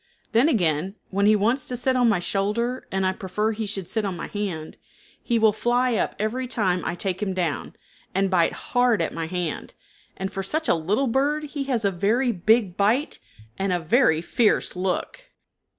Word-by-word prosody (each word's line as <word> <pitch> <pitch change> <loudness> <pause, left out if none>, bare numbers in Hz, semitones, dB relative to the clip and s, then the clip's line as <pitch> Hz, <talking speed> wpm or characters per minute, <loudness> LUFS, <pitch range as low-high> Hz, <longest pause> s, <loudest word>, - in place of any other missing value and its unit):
Then 245 +7 +4
again, 180 - 0 0.2
when 200 +1 +2
he 215 - +6
wants 230 +6 +1
to 250 - -2
sit 260 +2 +1
on 245 -2 +4
my 210 - +3
shoulder 210 +7 -1
and 190 0 0
I 185 - +1
prefer 210 +3 -2
he 220 0 -4
should 195 -3 -4
sit 220 +2 -1
on 190 -3 -3
my - - -5
hand, 185 -7 -4 0.4
he 235 - 0
will 220 -1 +4
fly 240 +3 +1
up 215 - 0
every 240 +5 -2
time 185 -7 0
I - - -2
take 190 +1 -3
him 190 -3 -1
down, 170 -6 -2 0.4
and 195 +1 +2
bite 170 -3 +3
hard 245 -3 +1
at - - -3
my 165 -1 -3
hand, 175 -2 -4 0.4
and 190 0 -4
for 195 - -2
such 315 +12 -2
a - - +5
little 190 +11 0
bird 280 +5 +1
he 290 -1 -4
has 245 -6 0
a 200 - +3
very 220 +8 +1
big 205 0 +2
bite 225 +10 +1 0.4
and 195 0 0
a 180 - +1
very 165 - +3
fierce 220 +1 +1
look. 185 - -2
205 Hz, 200 wpm, -24 LUFS, 185-240 Hz, 0.4 s, he